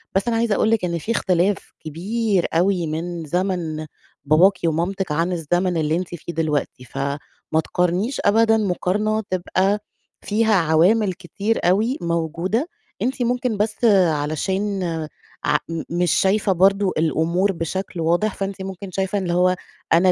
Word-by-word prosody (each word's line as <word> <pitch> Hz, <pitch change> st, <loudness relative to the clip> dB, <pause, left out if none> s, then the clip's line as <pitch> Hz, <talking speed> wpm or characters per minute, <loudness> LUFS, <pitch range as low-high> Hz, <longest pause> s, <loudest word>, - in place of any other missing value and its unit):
بس 195 Hz, +4 st, +1 dB
أنا 230 Hz, -1 st, +1 dB
عايزة 225 Hz, -2 st, +1 dB
أقول 220 Hz, -, +2 dB
لِك 225 Hz, -5 st, +2 dB
إن 170 Hz, -1 st, -1 dB
في 190 Hz, +8 st, -4 dB
اختلاف 190 Hz, -2 st, 0 dB
كبير 195 Hz, +5 st, -1 dB
أوي 175 Hz, 0 st, +2 dB
من 165 Hz, +2 st, -4 dB
زَمَن 170 Hz, -2 st, -2 dB, 0.4 s
باباكِ 175 Hz, +7 st, +5 dB
ومامتِك 175 Hz, +3 st, -1 dB
عن 165 Hz, +4 st, 0 dB
الزمن 175 Hz, +1 st, 0 dB
اللي 155 Hz, 0 st, +1 dB
أنتِ 180 Hz, +1 st, -2 dB
فيه 170 Hz, +1 st, -7 dB
دلوقتي. 150 Hz, -5 st, -2 dB
فما 140 Hz, +3 st, -3 dB, 0.4 s
تقارنيش 180 Hz, -, 0 dB
أبدًا 225 Hz, +2 st, +4 dB
مقارنة 210 Hz, +2 st, 0 dB
تبقى 185 Hz, +2 st, +1 dB, 0.4 s
فيها 220 Hz, +1 st, +1 dB
عوامل 185 Hz, +5 st, +3 dB
كتير 200 Hz, +4 st, -2 dB
أوي 215 Hz, +9 st, +2 dB
موجودة. 170 Hz, -, -1 dB, 0.3 s
أنتِ 260 Hz, +1 st, -1 dB
ممكن 245 Hz, -2 st, 0 dB
بس 215 Hz, +3 st, -1 dB, 0.2 s
علشان 190 Hz, +7 st, -1 dB, 0.6 s
ع -, -, +3 dB
م 165 Hz, -1 st, -3 dB
مش 175 Hz, +1 st, +1 dB
شايفة 200 Hz, +1 st, +2 dB
برضه 195 Hz, +1 st, +3 dB
الأمور 165 Hz, +4 st, +1 dB
بشكل 175 Hz, +1 st, -4 dB
واضح، 175 Hz, +6 st, +1 dB
فأنتِ 195 Hz, 0 st, -4 dB
ممكن 190 Hz, 0 st, -7 dB
شايفة 190 Hz, +2 st, -1 dB
اللي 180 Hz, -3 st, -2 dB
هو 180 Hz, +1 st, +3 dB, 0.4 s
أنا 180 Hz, +3 st, +5 dB
185 Hz, 145 wpm, -21 LUFS, 165-205 Hz, 0.6 s, باباكِ